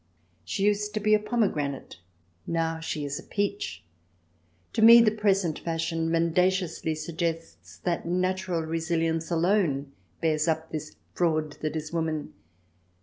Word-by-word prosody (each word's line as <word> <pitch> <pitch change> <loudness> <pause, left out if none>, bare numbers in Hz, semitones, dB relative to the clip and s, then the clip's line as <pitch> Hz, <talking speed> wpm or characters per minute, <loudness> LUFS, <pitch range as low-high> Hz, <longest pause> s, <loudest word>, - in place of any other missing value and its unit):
She 90 - -3
used 210 0 +1
to - - +1
be 215 +1 +2
a 215 - +6
pomegranate, 195 - -1 0.5
now 165 -1 -1
she 155 -2 -3
is 145 +2 -3
a - - -10
peach. 200 - -3 0.9
To - - 0
me 230 +1 +10
the 225 -2 +5
present 195 -6 +1
fashion 165 0 -2
mendaciously 170 0 +1
suggests 165 +1 -4
that 170 -2 -1
natural 185 -1 0
resilience 165 0 -1
alone 165 -5 +1 0.3
bears 155 -1 +1
up 160 0 -1
this 155 -1 -6 0.2
fraud 155 -3 +1
that 155 0 -2
is 155 0 -5
woman. 160 -2 -2
165 Hz, 135 wpm, -27 LUFS, 160-190 Hz, 0.9 s, me